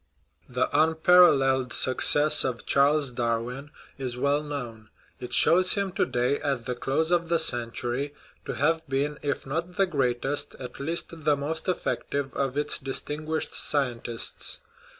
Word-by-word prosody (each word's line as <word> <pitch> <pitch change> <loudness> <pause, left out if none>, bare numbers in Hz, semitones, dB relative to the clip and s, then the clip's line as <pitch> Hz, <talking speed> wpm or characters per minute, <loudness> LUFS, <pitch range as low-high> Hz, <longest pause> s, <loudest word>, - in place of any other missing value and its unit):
The 125 0 0
unparalleled 155 -5 +4
success 145 +3 +5
of 125 -2 -4
Charles 140 0 +2
Darwin 120 +4 -3 0.3
is 125 -2 -4
well 140 +3 +1
known. 120 -7 -7 0.3
It 125 -1 -8
shows 180 +8 +5
him 200 -2 -1
to - - -1
day, 125 +3 0
at 135 -5 -3
the 125 - -2
close 140 +6 -1
of 170 -1 +1
the 170 - +2
cen 120 -7 +1
tury, 130 +5 -4 0.3
to - - -4
have 160 +3 +1
been, 145 +2 -2
if 145 -1 -3
not 165 +6 -4
the 195 - +4
greatest, 135 -3 -1
at 125 - -10
least 165 +5 -2
the 145 -1 +2
most 160 +5 -4
effective 140 -6 -3
of 135 0 -2
its 145 - +1
distinguished 150 +4 -3
scientists. 120 -5 -2
140 Hz, 150 wpm, -26 LUFS, 125-155 Hz, 0.3 s, success